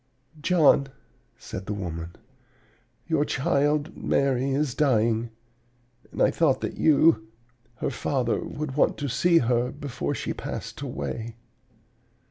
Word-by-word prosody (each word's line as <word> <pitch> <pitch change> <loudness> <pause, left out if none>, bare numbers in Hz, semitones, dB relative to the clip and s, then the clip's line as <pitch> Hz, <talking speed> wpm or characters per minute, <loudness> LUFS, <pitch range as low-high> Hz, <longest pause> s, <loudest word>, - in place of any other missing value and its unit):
"'John,' 155 -5 +4 0.5
said 95 - -8
the 105 - -2
woman, 85 -3 -5 0.9
'your 160 -3 +1
child 145 +2 0
Mary 135 -1 +1
is 140 -1 0
dying; 115 -5 +2 0.8
and - - 0
I - - +4
thought 155 -6 +2
that - - -4
you, 145 -7 +4 0.5
her - - -2
father, 125 -2 -1
would 150 -3 -5
want 150 - +2
to 145 - -3
see 165 +7 +3
her 120 +1 +1
before 140 -4 -4
she - - -3
passed - - -6
away.' 110 - -5
135 Hz, 120 wpm, -26 LUFS, 115-150 Hz, 0.9 s, John